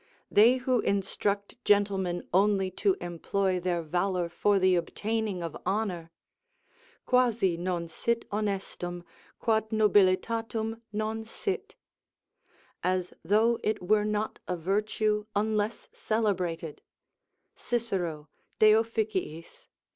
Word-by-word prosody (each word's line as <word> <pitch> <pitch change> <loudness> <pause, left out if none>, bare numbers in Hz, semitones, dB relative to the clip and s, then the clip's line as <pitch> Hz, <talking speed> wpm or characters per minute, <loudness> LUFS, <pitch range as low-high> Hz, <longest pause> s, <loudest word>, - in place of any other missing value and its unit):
They 230 +5 +6
who 255 -1 +1
instruct 200 +2 -1
gentlemen 195 -4 +1
only 195 0 +3
to 380 - +1
employ 185 +2 -1
their 175 -1 -1
valour 175 +2 -1
for 205 +4 +2
the 185 -1 +4
obtaining 205 +2 -2
of 165 -2 -5
honour: 185 -4 -2 1.0
"Quasi 235 -8 +3
non 175 -1 -2
sit 235 +8 -1
honestum, 195 -4 -3 0.3
quod 220 -1 +1
nobilitatum 220 +2 +2
non 215 +1 -2
sit;" 385 - -4 1.1
["As 185 0 -1
though 220 +6 +3
it 215 0 0
were 210 +3 +3
not 210 0 -2
a 180 - -2
virtue, 210 +4 0
unless 215 +1 0
celebrated" 180 -8 -1 0.7
Cicero 185 -10 -2 0.3
De 215 0 +7
Offic. 220 -1 0
iii. 165 -3 -3
205 Hz, 105 wpm, -28 LUFS, 180-220 Hz, 1.1 s, De